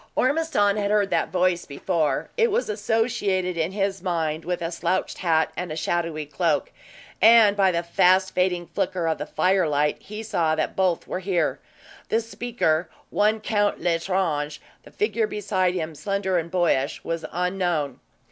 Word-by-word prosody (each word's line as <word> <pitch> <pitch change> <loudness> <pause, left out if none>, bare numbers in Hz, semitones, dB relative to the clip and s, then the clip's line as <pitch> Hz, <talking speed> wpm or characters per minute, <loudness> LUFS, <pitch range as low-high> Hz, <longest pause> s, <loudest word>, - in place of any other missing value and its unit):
Ormiston 260 -8 +2
had 200 -1 0
heard 205 -1 +2
that - - +1
voice 180 -1 +1
before; 155 +1 -1
it 465 -1 +3
was 445 - 0
associated 205 -4 0
in 165 +1 -1
his 195 -1 -1
mind 165 -3 -2
with 180 -1 -2
a 165 - -2
slouched 175 +2 -2
hat 160 -3 +2
and 170 -3 -4
shadowy 165 -2 -1
cloak; 145 - 0 0.5
and 220 -1 +7
by 195 -2 +3
the 170 -1 -1
fast 185 +2 +3
fading 180 -1 +1
flicker 185 -2 -2
of 160 - 0
the - - -4
firelight, 155 -6 +1
he 210 +2 -7
saw 165 -7 0
that 155 - -2
both 185 -3 0
were - - -3
here. 185 -2 0 0.5
The 225 - +2
speaker 225 -8 -1 0.2
was 215 +1 +2
Count 205 -2 +1
L'Estrange; 165 -4 -1 0.2
the - - -15
figure 235 - 0
beside 190 -3 0
him, 160 -2 -3
slender 190 +2 -1
and 165 0 -5
boyish, 165 -6 0
was 165 -1 -3
unknown. 175 -6 -1
185 Hz, 155 wpm, -24 LUFS, 165-205 Hz, 0.5 s, and